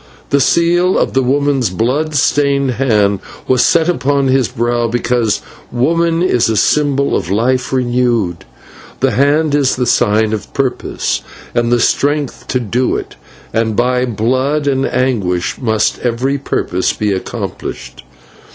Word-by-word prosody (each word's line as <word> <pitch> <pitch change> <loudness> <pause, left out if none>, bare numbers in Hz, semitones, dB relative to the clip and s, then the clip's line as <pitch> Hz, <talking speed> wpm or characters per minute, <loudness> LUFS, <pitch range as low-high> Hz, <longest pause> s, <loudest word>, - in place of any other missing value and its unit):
The 140 - +3
seal 175 +5 +2
of - - 0
the 135 - +2
woman's 135 -2 +1
blood 130 - -1
stained 140 -1 +2
hand 105 -6 +1 0.3
was 130 -1 +3
set 165 -1 +3
upon 140 -4 +1
his 130 -2 +2
brow 120 -1 -1
because 120 -2 0 0.3
woman 165 +7 +1
is 125 -11 +2
a 110 - 0
symbol 140 +3 +2
of 80 - -2
life 120 +6 0
renewed, 120 -8 0 0.6
the - - +2
hand 145 +3 +2
is 140 -3 +2
the 125 - -1
sign 110 -1 +2
of 110 - -5
purpose 135 -2 -2 0.3
and 120 0 0
the 120 - +3
strength 145 +3 0
to 125 - 0
do 125 +2 -1
it, - - -6 0.4
and 110 -1 0
by 125 +2 +1
blood 130 +6 0
and 135 -1 +1
anguish 105 -9 -1
must 110 -3 0
every 125 +4 -1
purpose 95 -8 -1
be 105 -2 -1
accomplished. 65 -9 -6
125 Hz, 140 wpm, -15 LUFS, 115-140 Hz, 0.6 s, The